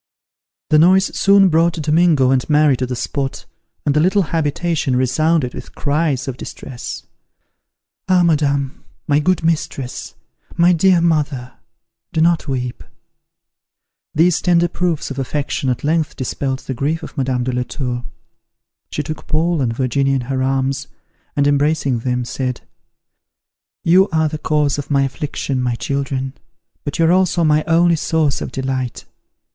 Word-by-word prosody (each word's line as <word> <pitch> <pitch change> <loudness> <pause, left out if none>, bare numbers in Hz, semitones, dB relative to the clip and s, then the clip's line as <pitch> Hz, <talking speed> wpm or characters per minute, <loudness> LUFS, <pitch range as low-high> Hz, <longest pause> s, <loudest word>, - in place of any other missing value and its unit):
The 155 - +6
noise 190 +4 +4
soon 195 -1 +5
brought 165 +1 +3
Domingo 155 -3 +3
and 130 +1 0
Mary 150 -2 +4
to 130 - -2
the 125 - -3
spot, 135 +2 -3 0.4
and 145 - +2
the - - +4
little 190 +5 +3
habitation 160 -3 0
resounded 130 +2 +1
with - - -10
cries 145 -3 0
of 130 -2 -4
distress, 125 -2 -7 1.1
"Ah, 180 -1 +4
madame! 140 -4 0 0.2
My 145 0 +2
good 180 +2 +1
mistress! 150 -5 -2 0.4
My 175 +1 +4
dear 175 +1 +4
mother! 145 -6 0 0.6
Do - - 0
not 165 0 +2
weep!" 125 -2 -3 1.3
These 165 +2 +3
tender 175 -1 +3
proofs 170 -4 -2
of 135 - -5
affections 135 0 -2
at 125 - -2
length 155 +1 0
dispelled 130 +1 -3
the 135 - -5
grief 150 +6 -2
of - - -9
Madame 130 -3 -1
de 130 - -1
la 125 - 0
Tour. 125 -1 -4 0.9
She 150 - -3
took 155 +1 -7
Paul 165 0 +1
and 120 -3 0
Virginia 135 +3 0
in 130 - 0
her 130 +1 -2
arms, 135 +1 -1 0.5
and, 140 - +2
embracing 145 -3 +1
them, 125 +1 -2
said, 125 0 -3 1.2
"You 185 +4 +5
are 160 -1 +2
the 155 0 -5
cause 150 -2 +1
of 145 - -6
my 140 -2 +3
affliction, 135 -1 -3
my 125 -1 0
children, 135 0 -3 0.5
but 145 - -4
you 165 - +3
are 165 - +4
also 180 -1 +2
my 155 -1 +3
only 170 +1 +4
source 155 -2 0
of - - -5
delight! 130 -2 -3
145 Hz, 150 wpm, -18 LUFS, 130-165 Hz, 1.3 s, The